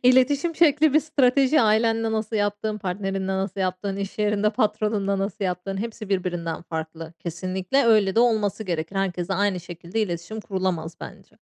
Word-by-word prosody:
İletişim 270 +6 +4
şekli 305 -2 +4
bir 310 - +6
strateji; 280 -1 +3
ailenle 225 0 +2
nasıl 220 0 -1
yaptığın, 205 +1 -1
partnerinle 195 0 -3
nasıl 195 0 -3
yaptığın, 185 +2 -2
iş 200 +1 -5
yerinde 210 0 +2
patronunla 210 -2 0
nasıl 195 +1 -3
yaptığın 180 +2 -3
hepsi 220 0 -5
birbirinden 175 -4 -2
farklı. 160 0 -6
Kesinlikle 185 - -1
öyle 210 -4 +4
de 230 - +4
olması 220 -3 +2
gerekir. 170 0 -3
Herkese 190 -1 -1
aynı 195 -1 +1
şekilde 175 +4 -5
iletişim 195 +2 -3
kurulamaz 185 -5 -2
bence. - - -11
200 Hz, 150 wpm, -24 LUFS, 185-225 Hz, -, bir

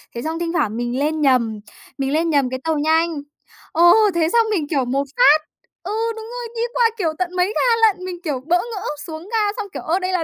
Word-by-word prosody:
Thế 235 - -4
xong 320 +2 -3
thinh 340 0 -2
thoảng 225 -10 0
mình 240 +2 -2
lên 305 +1 0
nhầm, 235 -6 +2 0.4
mình 270 0 -1
lên 330 +2 +1
nhầm 280 -5 +2
cái 260 0 -4
tàu 320 -1 0
nhanh, 320 0 +1 0.5
ờ, 335 +2 +2 0.3
thế 325 -1 +2
xong 460 -1 +4
mình 330 -8 0
kiểu 275 -5 0
một 270 +3 0
phát 310 -11 +6 0.4
ừ, - - -5 0.2
đúng 445 0 -8
rồi, 485 +1 -6
đi 460 - -2
qua, 475 -2 +3
kiểu, 340 -6 0
tận 365 0 -2
mấy 360 0 +3
ga - - 0 0.3
lận, 370 -3 -2
mình, 360 -1 -6
kiểu, 290 -6 -2
bỡ 350 +2 +3
ngỡ 435 0 -5 0.2
xuống 320 -1 -7
ga 420 -2 +1
xong 425 - -4
kiểu: - - -5
"Ơ, 340 +4 0
đây 370 0 -2
là 355 -3 +1
325 Hz, 240 wpm, -20 LUFS, 285-370 Hz, 0.5 s, phát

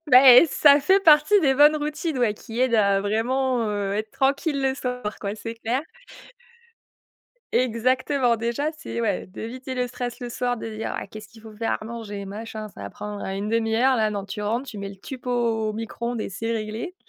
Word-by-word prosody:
Bah, 255 -1 +8
eh, 250 +7 +9
ça 285 0 +6
fait 380 +7 +4
partie 325 +4 +6
des 270 -4 +3
bonnes 295 +2 +6
routines, 300 0 -3
ouais, 230 -4 +2
qui 225 +2 -7
aident 255 -2 +2
à 200 -2 +3
vraiment, 235 +3 0
heu, 205 -1 -2
être 215 +1 -3
tranquille 280 +1 0
le 265 0 +1
soir, 250 -5 -4
quoi, 200 0 -3
c'est 225 +1 -7
clair. 235 +4 -2 1.7
Exactement, 255 +1 +1
déjà, 235 +7 -1
c'est 310 -7 -6
ouais, 225 - -1
d'éviter 255 +7 -7
le 250 0 0
stress 245 -1 -5
le 245 - -6
soir, 245 +1 -2
de 225 - -6
dire: 220 0 -5
«Ah, - - -5
qu'est-ce 215 0 -11
qu'il 220 +2 -17
faut 220 -1 -12
faire 225 +1 -1
à - - -8
manger? 220 -3 -6
Machin 215 +2 -7
ça 150 - -12
va 100 - -6
prendre 210 - -7
1/2 220 +3 -1
heure», 260 +2 +3
là 215 -2 +1
non, 200 -2 -4
tu 210 +1 -6
rentres, 235 +6 -2
tu 220 - -8
mets 200 0 -5
le 195 - -10
Tupperware 255 +6 -10
au 230 -3 0
micro-ondes 230 +1 -4
et - - -3
c'est 225 +4 -4
réglé. 220 +9 -4
230 Hz, 205 wpm, -24 LUFS, 215-260 Hz, 1.7 s, eh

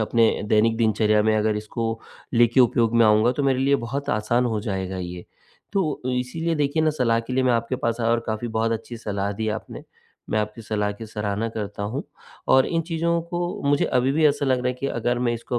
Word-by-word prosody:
अपने 115 +1 +3 0.2
दैनिक 110 +1 +3
दिनचर्या 110 -1 +2
में 110 0 +2
अगर 105 0 +1
इसको 115 +1 -3 0.3
लेके 120 +2 +4
उपयोग 120 -1 +3
में 115 - +6
आऊँगा 110 +3 +4
तो 145 - -2
मेरे 135 -2 +2
लिए 140 +1 +3
बहुत 140 +3 -3
आसान 120 +4 +1
हो 110 -3 -1
जाएगा 95 -3 -3
ये। 90 -1 -6 0.5
तो 180 -7 0 0.2
इसीलिए 165 +7 -2
देखिए 150 +1 +1
ना 155 - +3
सलाह 120 -6 +1
के 115 +2 -8
लिए 130 - +2
मैं 125 - +3
आपके 115 +2 0
पास 115 -2 -2
आया 115 0 +1
और 115 0 +2
काफ़ी 110 +2 -3
बहुत 115 +1 0
अच्छी 115 +1 -5
सलाह 100 -2 -3
दी 110 +2 -3
आपने, 110 +1 -5 0.5
मैं 110 - +1
आपकी 105 +2 -3
सलाह 105 -1 -1
की 110 +2 -9
सराहना 105 +1 -2
करता 105 -2 -5
हूँ। 110 +7 -3 0.5
और 130 0 +5
इन 165 -1 0
चीज़ों 170 0 0
को 175 +1 -4 0.2
मुझे 145 0 +3
अभी 130 +2 +1
भी 155 +1 +2
ऐसा 145 -1 +1
लग 130 -1 +2
रहा 125 - -2
है 125 - 0
कि 135 - -1
अगर 120 -1 -1
मैं 120 -1 +1
इसको 120 +1 -3
115 Hz, 225 wpm, -23 LUFS, 110-130 Hz, 0.5 s, में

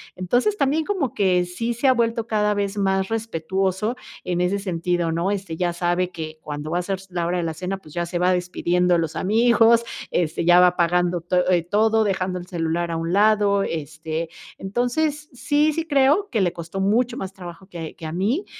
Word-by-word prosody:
Entonces, 245 - +1
también 295 +2 +1
como 320 - -1
que 180 -3 +2
sí 230 +7 -3
se 245 +4 +1
ha 260 - +6
vuelto 230 -2 0
cada 210 -2 +1
vez 200 0 -2
más 190 -1 +1
respetuoso 195 0 -1 0.3
en 175 -1 -1
ese 180 +3 +1
sentido 175 -3 -1
¿no? 170 +3 0
Este, 195 -5 -3
ya 175 +1 0
sabe 175 +1 0
que 155 -3 -7
cuando 150 +1 -6
va 175 - +1
a - - 0
ser 195 +2 -2
s 190 0 -16
la 175 -1 -1
hora 180 +1 0
de 175 - -1
la 165 -1 -2
cena, 185 +4 -4
pues 155 -6 -16
ya 175 0 -2
se 175 - -3
va 180 +1 +3
despidiendo 180 0 +1
de - - +2
los 165 -1 -3
amigos, 230 +2 +4 0.2
este, 165 -1 -1
ya 175 +1 +7
va 180 - +7
apagando 175 0 +1
to 180 +1 +1
eh, 175 -2 +3
todo, 220 +5 +2
dejando 185 -2 -1
el 175 - -10
celular 170 -1 -2
a 165 - -2
un 165 +1 -2
lado. 205 -1 +4
Este, 160 -1 -4 0.3
entonces, 280 +9 -1
sí, 295 +4 +1
sí 330 +1 -2
creo 285 +3 +4
que 225 - +1
le 175 -2 +1
costó 170 +2 -6
mucho 235 +5 +1
más 190 -6 -5
trabajo 180 -1 -10
que 170 -4 -7
que 165 - -9
a 155 - -4
mí. 220 - 0
185 Hz, 215 wpm, -22 LUFS, 175-220 Hz, 0.3 s, ya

